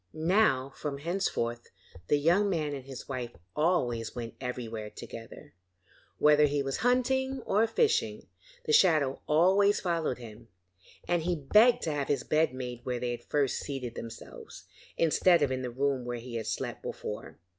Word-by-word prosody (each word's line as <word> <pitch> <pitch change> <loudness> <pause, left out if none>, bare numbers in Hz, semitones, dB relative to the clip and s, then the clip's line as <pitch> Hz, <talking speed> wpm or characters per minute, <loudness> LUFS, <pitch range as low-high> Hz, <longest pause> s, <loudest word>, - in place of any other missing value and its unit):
Now 155 -6 +2
from 145 -2 -4
henceforth 140 -8 -2 0.4
the 145 - +3
young 175 +8 +3
man 155 -5 -1
and 135 -2 -6
his 135 -2 -9
wife 125 -3 -5 0.2
always 125 -9 0
went 115 -2 -5
everywhere 115 -4 -5
together; 115 +1 -10 0.6
whether 150 0 +5
he 145 0 0
was 135 0 -2
hunting 265 +1 +1
or 215 +3 +3
fishing, 455 - +1 0.4
the 455 - 0
shadow 155 - +4
always 190 +6 +4
followed 170 -7 -1
him, 115 -1 -11 0.6
and 175 -1 +1
he 175 +2 0
begged 215 - +4
to 160 - -1
have 145 -2 -2
his 140 -3 0
bed 155 -2 +2
made 125 -2 -6
where 125 -1 -2
they 125 0 -2
had 120 0 -6
first 145 -3 0
seated 130 -4 -5
themselves, 115 -1 -9 0.3
instead 165 0 +4
of 140 - +1
in 130 0 -2
the 125 - -3
room 135 +1 -1
where 120 0 -4
he 120 +1 -9
had 115 -2 -3
slept - - -3
before. - - -6
145 Hz, 165 wpm, -29 LUFS, 125-175 Hz, 0.6 s, whether